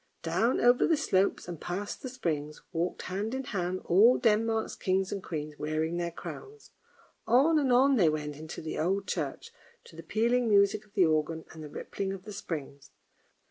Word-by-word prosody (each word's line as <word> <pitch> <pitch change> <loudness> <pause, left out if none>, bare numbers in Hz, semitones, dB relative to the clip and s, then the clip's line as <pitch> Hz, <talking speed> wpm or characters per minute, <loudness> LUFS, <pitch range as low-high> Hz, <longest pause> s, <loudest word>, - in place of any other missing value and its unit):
Down 180 +10 +1
over 245 +1 +4
the 325 - +3
slopes 195 -12 +1
and 170 -3 -7
past 200 +4 -4
the 260 - -5
springs, 155 - -3
walked 170 +2 -2
hand 205 +6 -3
in 265 - -3
hand 185 -5 -3
all 215 +8 +6
Denmark's 225 0 +1
kings 190 0 0
and 200 - -3
queens 150 -2 -5
wearing 155 +2 -1
their 170 -1 -1
crowns. 420 - -10 0.6
On 280 +8 +5
and 270 -3 +1
on 265 +2 +5
they 175 -7 +5
went 150 -1 -3
into 155 +2 -8
the 155 - -4
old 195 +5 0
church, 465 - -4 0.3
to 475 - -16
the - - -8
pealing 235 +2 +1
music 200 +1 +3
of 205 - -28
the 190 -4 +5
organ, 160 0 0
and 160 -1 -10
the 150 - -8
rippling 195 +5 -4
of 190 -1 -8
the 210 0 -8
springs. 145 -7 -6
195 Hz, 185 wpm, -29 LUFS, 160-230 Hz, 0.6 s, all